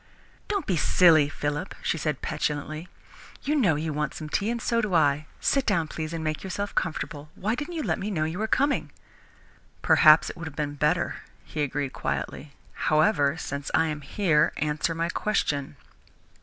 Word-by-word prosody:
"Don't 405 -2 -1
be 185 - 0
silly, 155 -1 +5
Philip," 150 +4 -3
she - - +1
said 150 -3 -2
petulantly. 150 +2 -3 0.6
"You 295 +2 0
know 200 - +3
you 155 +1 -2
want 150 -1 -2
some 155 - -6
tea, 200 +7 0
and 235 0 -1
so 230 0 +1
do 205 -5 -1
I. 150 -1 +3
Sit 275 - +2
down, 180 -9 +1
please, 155 0 -4
and 165 -1 -4
make 155 -1 -2
yourself 200 +1 -4
comfortable. 150 -2 -3
Why 210 +4 -1
didn't 300 +8 -4
you 315 - -2
let - - -1
me 200 +2 -3
know 165 -7 0
you 160 +4 -3
were 220 - 0
coming?" 280 +5 +1 0.9
"Perhaps 155 0 +6
it - - -14
would 165 -1 -6
have 155 - -9
been 145 -1 -2
better," 150 +4 0 0.3
he 150 - -4
agreed 145 -1 -2
quietly. 140 +1 -4 0.2
"However, 155 -2 +2
since 140 -3 -4
I 160 0 +3
am 150 -1 -4
here, 150 0 +2
answer 150 +2 -1
my 165 +1 -1
question." 150 -9 -1
160 Hz, 185 wpm, -26 LUFS, 150-195 Hz, 0.9 s, Perhaps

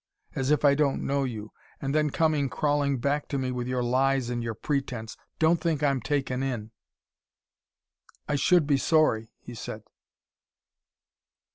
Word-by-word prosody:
as 135 0 -1
if 150 0 +3
I 140 - +7
don't 140 -1 +1
know 140 0 +1
you. 110 -4 -6 0.3
And 135 0 -2
then 150 0 +2
coming 150 -2 +1
crawling 145 -2 +1
back 140 +4 -1
to 140 - -2
me 130 -1 -1
with 125 -1 -3
your 125 -1 -1
lies 130 0 +1
and 120 -1 -2
your 115 -1 -3
pretense. 125 -4 -3 0.2
Don't 160 +1 +3
think 160 -4 0
I'm 140 -3 +2
taken 130 +1 -1
in." 120 -5 -3 1.6
"I - - -1
should 155 +3 +4
be 140 -1 +3
sorry," 135 -7 +2
he 120 - -11
said. 110 -1 -7
135 Hz, 155 wpm, -27 LUFS, 125-145 Hz, 1.6 s, I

